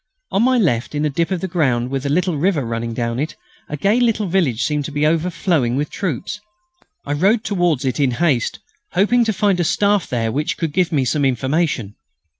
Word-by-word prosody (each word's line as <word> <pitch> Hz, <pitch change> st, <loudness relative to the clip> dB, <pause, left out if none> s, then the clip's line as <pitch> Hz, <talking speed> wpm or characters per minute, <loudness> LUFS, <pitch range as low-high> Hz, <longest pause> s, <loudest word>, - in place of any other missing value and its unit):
On 195 Hz, -, +2 dB
my 255 Hz, +2 st, +3 dB
left, 150 Hz, -, 0 dB
in 150 Hz, +1 st, 0 dB
a 150 Hz, -, 0 dB
dip 165 Hz, +4 st, 0 dB
of 190 Hz, -1 st, -2 dB
ground 130 Hz, -8 st, 0 dB
with 135 Hz, 0 st, -2 dB
a -, -, -1 dB
little 180 Hz, +3 st, +1 dB
river 155 Hz, -3 st, +1 dB
running 115 Hz, 0 st, -3 dB
down 115 Hz, 0 st, -2 dB
it, 155 Hz, +3 st, -3 dB, 0.3 s
a 150 Hz, -, -4 dB
gay 205 Hz, -, +2 dB
little 225 Hz, -3 st, +1 dB
village 165 Hz, -, +1 dB
seemed 150 Hz, -1 st, 0 dB
to -, -, -5 dB
be 145 Hz, +1 st, 0 dB
overflowing 165 Hz, -5 st, +1 dB
with 145 Hz, +2 st, -2 dB
troops. 180 Hz, -, -3 dB, 0.7 s
I 145 Hz, -, -2 dB
rode 200 Hz, +9 st, +2 dB
towards 175 Hz, -9 st, 0 dB
it 130 Hz, +3 st, -1 dB
in 140 Hz, -2 st, +3 dB
haste, 150 Hz, -9 st, +1 dB, 0.4 s
hoping 225 Hz, +6 st, +3 dB
to 220 Hz, -, +1 dB
find 205 Hz, -3 st, +1 dB
a -, -, +2 dB
Staff 200 Hz, +3 st, +2 dB
there 115 Hz, -2 st, -1 dB
which 150 Hz, +6 st, -2 dB
could 160 Hz, -3 st, -2 dB
give 180 Hz, 0 st, +1 dB
me 140 Hz, -5 st, +1 dB
some 145 Hz, +4 st, 0 dB
information. 130 Hz, -, 0 dB
155 Hz, 210 wpm, -19 LUFS, 130-185 Hz, 0.7 s, my